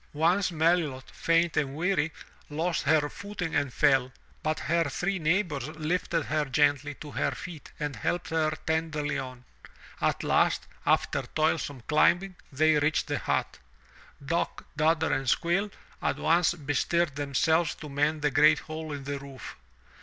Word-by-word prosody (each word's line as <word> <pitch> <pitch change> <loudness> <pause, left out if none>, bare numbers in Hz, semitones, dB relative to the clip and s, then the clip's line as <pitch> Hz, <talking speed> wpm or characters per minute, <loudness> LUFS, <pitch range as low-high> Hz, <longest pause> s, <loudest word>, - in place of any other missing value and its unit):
Once 175 +6 +2
Melilot, 160 -5 +1
faint 165 0 +1
and 140 -2 0
weary, 165 -1 +1 0.4
lost 160 +3 -1
her 155 -2 +3
footing 200 0 -5
and 140 - +1
fell, 135 -2 +3 0.3
but 155 0 -1
her 165 +5 +1
three 180 +7 -2
neighbors 155 -5 0
lifted 160 +1 -1
her 155 0 0
gently 145 +1 +1
to 150 +1 -10
her - - 0
feet 165 -4 -8
and 150 -2 -3
helped 175 -1 -2
her 160 -1 +2 0.2
tenderly 155 -3 -1
on. 130 -1 -8 0.6
At - - 0
last, - - +2 0.2
after - - +2
toilsome 155 -4 -1
climbing, 175 +8 +2 0.2
they 155 +2 +3
reached 150 +1 +1
the - - -2
hut. - - -1 0.7
Dock, 170 +4 -2
Dodder 160 0 +2
and 135 -2 0
Squill 175 +8 +1 0.3
at - - 0
once 170 +1 +3
bestirred 150 +1 0
themselves 145 +3 +1
to 150 - -9
mend 150 +2 0
the 145 - +2
great 150 +2 +6
hole 155 0 -6
in 140 -1 -6
the 140 +1 -4
roof. 135 -2 -9
155 Hz, 150 wpm, -28 LUFS, 145-165 Hz, 0.7 s, great